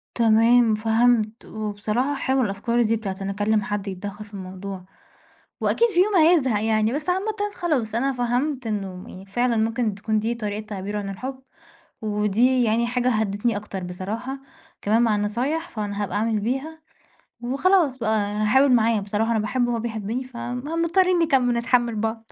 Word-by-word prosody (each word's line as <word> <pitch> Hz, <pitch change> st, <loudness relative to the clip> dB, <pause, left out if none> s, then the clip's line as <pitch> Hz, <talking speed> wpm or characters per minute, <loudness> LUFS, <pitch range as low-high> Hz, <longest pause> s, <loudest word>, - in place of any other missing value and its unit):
تمام 230 Hz, 0 st, +4 dB
فهمت، 225 Hz, 0 st, +1 dB
وبصراحة 215 Hz, +6 st, -2 dB
حلوة 265 Hz, -1 st, +1 dB
الأفكار 225 Hz, +3 st, 0 dB
دي 225 Hz, -1 st, +2 dB
بتاعة 205 Hz, -4 st, -4 dB
إن 195 Hz, -, -3 dB
أكلّم 205 Hz, +2 st, +1 dB
حد 205 Hz, 0 st, -3 dB
يتدخّل 200 Hz, +2 st, -6 dB
في 210 Hz, -, -20 dB
الموضوع، 190 Hz, 0 st, -7 dB, 0.8 s
وأكيد 470 Hz, -, +3 dB
في 360 Hz, -4 st, +3 dB
يوم 415 Hz, 0 st, -1 dB
هيزهق 310 Hz, -, +4 dB
يعني، 220 Hz, +1 st, +2 dB
بس 300 Hz, +5 st, -3 dB
عامةً 390 Hz, +4 st, 0 dB, 0.2 s
خلاص 280 Hz, -, -1 dB
أنا 270 Hz, +4 st, +1 dB
فهمت 250 Hz, +2 st, -1 dB
إنه 190 Hz, -2 st, -5 dB
فعلًا 240 Hz, +4 st, 0 dB
ممكن 225 Hz, -1 st, 0 dB
تكون 215 Hz, +1 st, -1 dB
دي 225 Hz, +3 st, -1 dB
طريقة 210 Hz, -2 st, -4 dB
تعبيرُه 205 Hz, 0 st, -4 dB
عن 200 Hz, -1 st, -5 dB
الحُب، 260 Hz, +7 st, -6 dB, 0.6 s
ودي 215 Hz, +4 st, +2 dB
يعني 230 Hz, +1 st, +2 dB
حاجة 245 Hz, +1 st, 0 dB
هدّتني 215 Hz, 0 st, 0 dB
أكتر 205 Hz, -2 st, -6 dB
بصراحة، 215 Hz, +9 st, -5 dB, 0.4 s
كمان 220 Hz, +3 st, +3 dB
مع 225 Hz, -3 st, +3 dB
النصايح 250 Hz, +11 st, -1 dB
فأنا 205 Hz, -2 st, -3 dB
هابقى 200 Hz, 0 st, -4 dB
أعمل 220 Hz, 0 st, 0 dB
بيها، 270 Hz, +8 st, -3 dB, 0.6 s
وخلاص 280 Hz, +3 st, +2 dB
بقى 220 Hz, -2 st, +1 dB
هاحاول 215 Hz, +7 st, +2 dB
معاه 230 Hz, -2 st, +3 dB
بصراحة 210 Hz, +3 st, -1 dB
أنا 225 Hz, -, +2 dB
باحبّه 240 Hz, +3 st, 0 dB
وهو 235 Hz, -, -1 dB
بيحبّني 225 Hz, +2 st, -3 dB
فم 245 Hz, 0 st, -6 dB, 0.2 s
مضطرين 365 Hz, +1 st, +3 dB
نكم 265 Hz, -7 st, +2 dB
نتحمّل 240 Hz, -1 st, +1 dB
بعض. 225 Hz, +1 st, -3 dB
225 Hz, 160 wpm, -23 LUFS, 210-255 Hz, 0.8 s, تمام